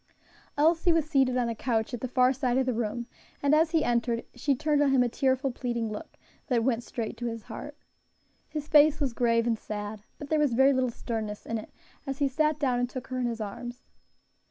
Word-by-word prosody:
Elsie 330 +4 +4
was 325 -2 +2
seated 265 -4 +2
on 245 -1 +1
a 230 - -1
couch 225 0 -1
at 240 - -4
the 255 - -2
far 255 +1 +3
side 255 -2 0
of 265 - +2
the 255 - 0
room, 235 +1 -2 0.4
and 285 +1 +3
as 315 +1 +4
he 320 -2 +2
entered 235 -1 0
she 275 +3 0
turned 300 +1 +1
on 290 - +4
him 265 -2 +4
a - - +1
tearful, 265 +2 +1
pleading 235 -3 -3
look, 215 +10 -8 0.3
that 240 -4 +2
went 240 -2 +1
straight 230 -2 -4
to 240 - -3
his 230 -2 -5
heart. 295 +7 -8 0.7
His 300 -1 -5
face 305 0 +6
was 275 -5 0
grave 230 -1 +2
and 230 -2 0
sad, 210 0 -5 0.2
but 290 - -8
there 310 - +2
was 290 -5 +2
very 265 +3 +5
little 260 -1 +1
sternness 220 -3 -5
in 230 -1 -2
it, 215 - -11 0.4
as 270 -1 -3
he 285 -1 +2
sat 305 +3 +1
down 260 -5 +1
and 245 0 0
took 255 -2 -7
her 255 0 -3
in 245 - 0
his 230 -1 -3
arms. 240 +4 -6
255 Hz, 230 wpm, -28 LUFS, 235-285 Hz, 0.7 s, face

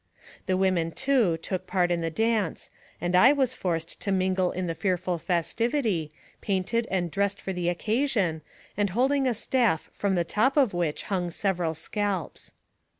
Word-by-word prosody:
The 185 -1 +2
women, 185 -3 +1
too, 240 -7 +2
took 180 +3 -5
part 180 -2 +1
in 170 -1 0
the 165 - -1
dance, 220 +1 -1 0.3
and 175 +2 0
I 250 +10 +7
was 265 -3 +1
forced 170 -8 -3
to 200 - -1
mingle 185 -1 +1
in 185 0 -3
the 165 - -2
fearful 180 -1 -1
festivity, 180 - 0 0.3
painted 210 +4 0
and 175 -3 -1
dressed 200 +2 0
for 190 - -4
the 175 -1 -1
occasion, 205 - 0 0.3
and 205 0 +1
holding 265 +7 +2
a 245 - +1
staft 230 -7 +1
from 200 -2 0
the 175 - +2
top 230 - +1
of 260 -9 +4
which 170 -4 -1
hung 180 -4 -2
several 175 -2 -1
scalps. 200 +1 -3
190 Hz, 165 wpm, -27 LUFS, 175-225 Hz, 0.3 s, I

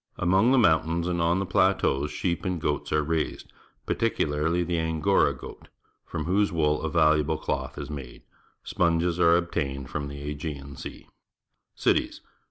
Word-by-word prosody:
Among 95 +8 +3
the 135 - +4
mountains 85 -4 +2
and 85 -1 -1
on 85 +2 +2
the 95 - -1
plateaus 70 -5 +2
sheep 85 +4 -2
and 90 -3 -2
goats 75 -2 -2
are 75 0 +2
raised, 80 +1 -3 0.3
particularh^ 85 -5 0
the 85 -1 -1
Angora 80 +1 +2
goat, 60 - -11 0.4
from 80 - -4
whose 100 +4 +2
wool 75 -3 +1
a 80 - -2
valuable 80 -1 +3
cloth - - -3
is 70 +1 -6
made. 70 -4 -8 0.4
Sponges 85 0 +1
are 85 -1 +5
obtained 70 -6 -3
from 70 -1 -3
the 70 0 -8
Aegean 70 -1 -6
Sea. - - -9 0.7
Cities. - - 0
80 Hz, 155 wpm, -26 LUFS, 75-85 Hz, 0.7 s, are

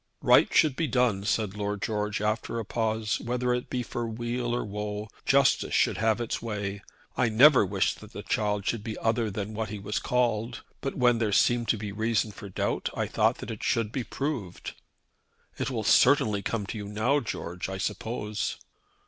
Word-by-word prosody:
"Right - - +6
should 150 -4 +4
be 165 +2 0
done," 115 -6 +1
said 105 -2 0
Lord 105 0 -2
George, 105 -1 -1
after 110 +2 -1
a 115 - -3
pause. 110 -1 -1
"Whether 125 +1 -1
it 125 0 -3
be 125 -1 -2
for 120 0 -4
weal 120 +2 -3
or 120 - -2
woe, 105 +1 -4 0.2
justice - - +3
should - - +3
have 110 0 +2
its 120 -1 -3
way. 100 -3 -4 0.3
I 120 - +2
never 130 +4 +7
wished 95 0 0
that - - -12
the - - -7
child 105 -2 0
should 115 -2 -1
be 110 -1 -5
other 115 0 0
than 105 +1 -4
what 110 0 -3
he 105 - -5
was 105 +1 -2
called; 120 -1 0 0.2
but 135 - -3
when 120 -3 +3
there 110 -3 +1
seemed 120 +3 +3
to 110 - +2
be 105 -1 -5
reason 110 +1 0
for 100 0 -10
doubt - - -1
I - - 0
thought - - +2
that - - -6
it - - -7
should 115 -2 +1
be 130 0 -2
proved." 125 - -4 0.9
"It - - -1
will 115 -4 -2
certainly 110 -4 +4
come 105 0 -2
to 105 +2 -5
you 100 - -6
now, 110 +8 +1
George, 90 -7 -5
I 95 - -4
suppose." 105 +2 -3
110 Hz, 195 wpm, -28 LUFS, 105-120 Hz, 0.9 s, never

